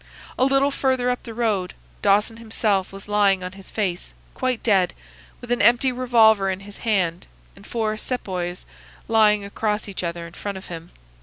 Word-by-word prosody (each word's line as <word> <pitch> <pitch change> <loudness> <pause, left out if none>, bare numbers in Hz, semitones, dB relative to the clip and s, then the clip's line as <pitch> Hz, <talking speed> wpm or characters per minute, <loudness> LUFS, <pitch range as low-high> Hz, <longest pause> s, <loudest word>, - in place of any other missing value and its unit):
A 255 - +2
little 275 +1 +3
further 260 -2 +1
up 250 - -3
the 230 - -9
road 210 -6 0 0.3
Dawson 210 +3 +3
himself 215 -4 -1
was 195 +1 -10
lying 200 -2 +3
on 180 - -5
his 190 0 -12
face, 185 -5 -3 0.2
quite 255 -2 -2
dead, 195 -5 +3 0.5
with 245 - -8
an 245 - +2
empty 240 +5 +4
revolver 225 -5 +4
in 190 0 -3
his 200 0 -11
hand 185 -7 0 0.3
and - - -15
four 220 -2 -1
Sepoys 185 -7 -4 0.4
lying 210 -2 +4
across 210 +1 -2
each 200 - -5
other 170 0 -3
in 170 - -11
front 200 +1 -5
of 190 - -10
him. 165 0 -8
210 Hz, 175 wpm, -23 LUFS, 190-235 Hz, 0.5 s, empty